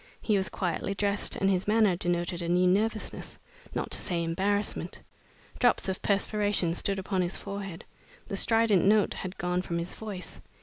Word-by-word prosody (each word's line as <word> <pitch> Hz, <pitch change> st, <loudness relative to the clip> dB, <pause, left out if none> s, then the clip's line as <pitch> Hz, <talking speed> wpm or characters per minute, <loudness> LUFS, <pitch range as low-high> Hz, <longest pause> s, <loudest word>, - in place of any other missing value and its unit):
He 215 Hz, -, +1 dB
was 190 Hz, -1 st, +1 dB
quietly 190 Hz, +1 st, -2 dB
dressed, 200 Hz, +1 st, 0 dB
and 195 Hz, -, +1 dB
his 190 Hz, -1 st, +1 dB
manner 210 Hz, -3 st, +4 dB
denoted 175 Hz, 0 st, -1 dB
a 170 Hz, -, -3 dB
new 180 Hz, +1 st, +3 dB
nervousness, 215 Hz, +4 st, 0 dB, 0.4 s
not -, -, -2 dB
to -, -, +2 dB
say 170 Hz, -3 st, -1 dB
embarrassment. 195 Hz, +5 st, -1 dB, 0.6 s
Drops 245 Hz, -4 st, +3 dB
of 190 Hz, 0 st, -2 dB
perspiration 205 Hz, -3 st, +1 dB
stood 195 Hz, +3 st, 0 dB
upon 190 Hz, 0 st, -1 dB
his 175 Hz, +1 st, -1 dB
forehead. 195 Hz, -4 st, -6 dB, 0.4 s
The -, -, -3 dB
strident 225 Hz, -3 st, +4 dB
note 210 Hz, +1 st, +4 dB
had 185 Hz, 0 st, -6 dB
gone 180 Hz, +1 st, 0 dB
from 170 Hz, -2 st, -3 dB
his 170 Hz, +1 st, -3 dB
voice. 200 Hz, -5 st, -7 dB
195 Hz, 170 wpm, -29 LUFS, 180-205 Hz, 0.6 s, manner